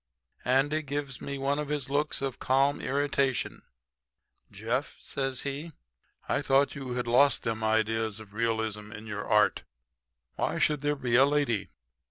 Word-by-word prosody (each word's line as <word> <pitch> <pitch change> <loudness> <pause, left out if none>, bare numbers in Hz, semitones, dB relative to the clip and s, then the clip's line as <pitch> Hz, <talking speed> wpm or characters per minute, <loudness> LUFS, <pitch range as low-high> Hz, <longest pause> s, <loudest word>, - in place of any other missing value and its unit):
"Andy 140 +5 +2
gives 140 -2 -4
me 140 0 -4
one 140 +2 0
of 150 -1 -3
his 145 -3 -2
looks 145 0 0
of 135 -2 -3
calm 135 +2 +2
irritation. 140 -1 0 0.9
"'Jeff,' - - -2
says 135 -2 -3
he, 145 +4 -5 0.5
'I - - +1
thought 135 +1 +3
you 135 -3 -5
had 125 0 -2
lost 130 +4 +4
them 110 -1 -2
ideas 110 -1 +1
of 105 -2 -13
realism 110 -2 -1
in 110 0 -9
your 105 -2 -5
art. 105 -1 +3 0.8
Why - - 0
should 150 -2 +2
there 145 0 +1
be 125 -4 0
a 135 - +7
lady? 140 -8 0
135 Hz, 155 wpm, -29 LUFS, 110-140 Hz, 0.9 s, a